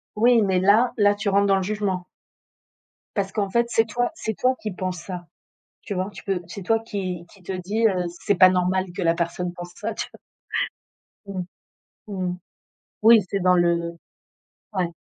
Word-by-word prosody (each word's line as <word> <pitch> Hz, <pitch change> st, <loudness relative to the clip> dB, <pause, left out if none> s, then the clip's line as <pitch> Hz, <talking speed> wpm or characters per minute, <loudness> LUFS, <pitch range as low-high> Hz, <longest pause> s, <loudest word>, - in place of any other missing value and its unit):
Oui, 235 Hz, +1 st, +5 dB
mais 190 Hz, -2 st, +2 dB
là 210 Hz, +6 st, +4 dB
là, 205 Hz, -1 st, +4 dB
tu 205 Hz, -, -4 dB
rentres 200 Hz, +1 st, +3 dB
dans 195 Hz, -, +4 dB
le 190 Hz, -, -1 dB
jugement. 195 Hz, -3 st, -2 dB, 1.1 s
Parce 195 Hz, -2 st, -1 dB
qu'en 200 Hz, -2 st, -1 dB
fait, 235 Hz, +4 st, +2 dB
c'est 225 Hz, -1 st, +3 dB
toi 245 Hz, +5 st, 0 dB
c'est 220 Hz, -8 st, -3 dB
toi 255 Hz, +1 st, +3 dB
qui 215 Hz, -, -3 dB
penses 185 Hz, -1 st, -3 dB
ça, 175 Hz, 0 st, -7 dB, 0.6 s
tu 205 Hz, -, -4 dB
vois? 185 Hz, +2 st, -2 dB
Tu -, -, -10 dB
peux 195 Hz, -3 st, 0 dB
c'est 200 Hz, +2 st, -7 dB
toi 225 Hz, +5 st, +2 dB
qui 185 Hz, -6 st, -4 dB
qui 195 Hz, -, -19 dB
te 185 Hz, -, -5 dB
dis, 200 Hz, +5 st, 0 dB
heu: 185 Hz, -4 st, +1 dB, 0.2 s
«C'est 205 Hz, -, +2 dB
pas 185 Hz, +1 st, +8 dB
normal 185 Hz, +1 st, +1 dB
que 195 Hz, -, -2 dB
la 165 Hz, -1 st, +3 dB
personne 175 Hz, +1 st, -2 dB
pense 175 Hz, 0 st, -9 dB
ça», 220 Hz, +1 st, -3 dB
tu -, -, -3 dB
vois? -, -, -14 dB, 1.1 s
Mmh. 195 Hz, -2 st, -4 dB, 0.6 s
Mmh 190 Hz, -3 st, -3 dB
mh. 180 Hz, -, -4 dB, 0.6 s
Oui, 225 Hz, +1 st, +8 dB
c'est 200 Hz, -, -1 dB
dans 180 Hz, 0 st, +5 dB
le 170 Hz, -1 st, +1 dB, 0.8 s
ouais. 180 Hz, -3 st, -1 dB
195 Hz, 190 wpm, -24 LUFS, 180-210 Hz, 1.1 s, pas